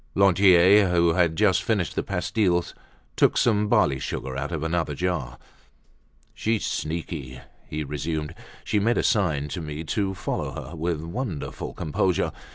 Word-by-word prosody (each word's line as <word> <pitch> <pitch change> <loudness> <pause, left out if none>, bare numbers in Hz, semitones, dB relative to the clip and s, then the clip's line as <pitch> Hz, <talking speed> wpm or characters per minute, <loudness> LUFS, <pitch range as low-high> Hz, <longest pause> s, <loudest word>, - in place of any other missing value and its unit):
Lantier, 95 0 +6
who 85 -1 +3
had 85 -3 +1 0.2
finished 100 -6 -1
the - - -1
pastilles, 90 -5 0 0.4
took - - +3
some 105 -3 +2
barley 70 -9 +3
sugar 65 0 -4
out 65 +5 -3
of 80 -3 -3
another 80 -2 -1
jar. 70 -8 -2 1.0
"She's 110 -1 -1
sneaky," 75 -5 -4 0.3
he 75 0 -3
resumed. 75 +2 -3 0.3
"She 105 - 0
made 115 +4 +1
a - - +1
sign 80 - +1
to 85 - -4
me 75 0 -5
to 95 +4 -1
follow 95 - -3 0.2
her, 85 - -9
with 80 -1 -2
wonderful 85 - -5
composure. 85 +4 0
85 Hz, 145 wpm, -25 LUFS, 75-95 Hz, 1.0 s, Lantier